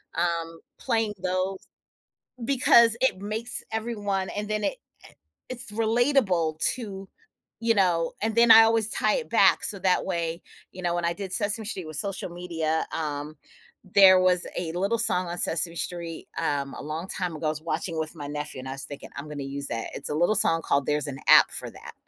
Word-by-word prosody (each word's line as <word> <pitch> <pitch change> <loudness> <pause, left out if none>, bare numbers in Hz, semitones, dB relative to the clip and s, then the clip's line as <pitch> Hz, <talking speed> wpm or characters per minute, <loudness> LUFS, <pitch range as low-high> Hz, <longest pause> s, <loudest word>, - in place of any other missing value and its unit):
um, 165 -1 -2 0.2
playing 225 -4 -1
those 185 +1 -2 0.8
because 235 -4 +5
it 260 -8 +2
makes 220 +4 -4
everyone 205 -4 -2
and 210 0 -4
then 215 0 -2
it - - 0
i - - -34 0.7
it's 245 -3 -6
relatable 220 - +1
to, 195 -5 -2 0.5
you 230 0 +3
know, 175 -5 +2
and 220 0 -1
then, 235 0 +4
I 225 0 +11
always 225 -1 +2
tie - - +1
it - - -3
back - - +4
so 200 - -1
that 185 0 +1
way 170 -2 -3 0.3
you 185 - -9
know, 175 0 0
when 175 - -2
I 170 - +1
did 190 0 -7
Sesame 210 0 0
Street 190 -6 -5
with 155 -1 -6
social 195 +1 -3
media, 165 -2 -2
um, 150 -1 -4 0.6
there 190 -2 +8
was 180 -1 +2
a 165 -2 -3
little 200 +6 0
song 180 -5 +2
on 175 +1 -4
Sesame 170 +1 +1
Street, 170 -2 -5
um, 140 -1 -2
a - - -8
long 155 +4 -5
time 180 -4 -2
ago, 155 - -4
I - - +2
was 155 0 -6
watching 170 0 -3
with 155 +1 -2
my 145 -2 -7
nephew 150 -2 -5
and 130 - -8
I - - -4
was 135 - -5
thinking, 145 - -9
"I'm 145 +2 -7
gonna 145 -2 -6
use 140 - -2
that." 115 -1 -4
It's 140 - -4
a - - -1
little 175 +7 +2
song 165 -5 +4
called 140 -1 +1
There's 150 0 0
an 135 -1 -7
App - - +8
for - - -5
That. - - -12
180 Hz, 200 wpm, -26 LUFS, 160-215 Hz, 0.8 s, I